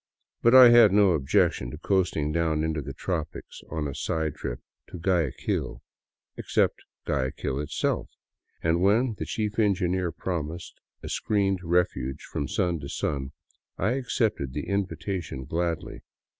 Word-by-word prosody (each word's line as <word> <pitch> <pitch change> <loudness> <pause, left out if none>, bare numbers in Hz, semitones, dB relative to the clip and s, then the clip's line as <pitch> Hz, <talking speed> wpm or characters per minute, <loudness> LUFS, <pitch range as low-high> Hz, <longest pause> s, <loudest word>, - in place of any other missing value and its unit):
But 120 +2 +5
I 130 -2 +11
had 120 -4 +8
no 100 -1 +5
objection 65 -4 +1
to - - -8
coasting 90 -6 0
down 80 -1 +1
into 80 -1 -1
the 70 0 -6
tropics 80 +1 -5
on 75 -2 -2
a 70 - -5
side 80 +2 -2
trip - - -5 0.3
to - - -8
Guayaquil 80 -7 -1 0.3
— - - -54
except - - +1 0.2
Guayaquil 65 -1 -2
itself; 75 - -1 0.5
and 80 +1 +2
when 110 +6 +3
the - - -3
chief 110 0 -2
engineer 95 -4 +1
promised 85 0 -4 0.3
a - - -6
screened 100 -3 0
refuge 80 -7 0
from 70 - -4
sun 85 +3 0
to 70 -1 -7
sun, 70 -1 -3 0.4
I 110 - +1
accepted 115 - -1
the 75 - -4
invitation 95 -7 -3
gladly. 85 +1 -3
85 Hz, 145 wpm, -26 LUFS, 75-100 Hz, 0.5 s, I